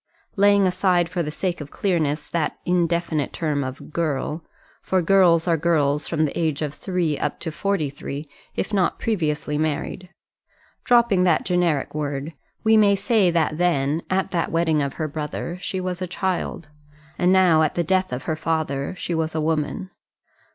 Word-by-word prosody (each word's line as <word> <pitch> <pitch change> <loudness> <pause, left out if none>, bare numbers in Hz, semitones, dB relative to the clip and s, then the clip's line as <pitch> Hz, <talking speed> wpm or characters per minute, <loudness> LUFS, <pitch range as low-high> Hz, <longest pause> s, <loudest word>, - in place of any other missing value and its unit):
Laying 200 0 +5
aside 180 -2 +2
for 180 0 -2
the 150 - -2
sake 175 +2 -3
of 145 - -7
clearness 155 -6 -1
that 165 -3 -1
indefinite 170 -4 0
term 150 -4 -1
of 130 +3 -7
girl 155 0 -2 0.4
for 190 - +1
girls 175 -2 +4
are 165 -1 +3
girls 150 -3 +1
from 160 -2 +1
the 145 - -4
age 155 -3 0
of 150 -1 -3
three 175 -4 -1
up 150 - -2
to 165 - -3
forty 195 -2 -1
three, 140 +1 -7 0.3
if - - -3
not 190 -3 +2
previously 150 -8 -1
married 155 +4 -2 0.7
dropping 235 -6 +4
that 170 -3 +2
generic 175 -6 +1
word, 145 0 -3 0.3
we 220 0 +5
may 205 -2 +5
say 210 -3 +2
that 160 -2 0
then, 160 -3 +1
at 190 0 0
that 170 -2 -1
wedding 160 -2 +2
of 140 -1 -2
her 155 - -2
brother, 155 +4 -5
she 190 - -3
was 180 0 -4
a 185 - -2
child; 180 -2 -3 0.5
and 180 +1 +4
now, 180 -4 +5
at 155 - +1
the 175 - +1
death 185 +2 +1
of 125 +1 -4
her 160 - -1
father, 155 -2 -2
she 175 - -3
was 160 -1 -1
a - - +1
woman. 160 +5 -1
165 Hz, 175 wpm, -23 LUFS, 150-185 Hz, 0.7 s, Laying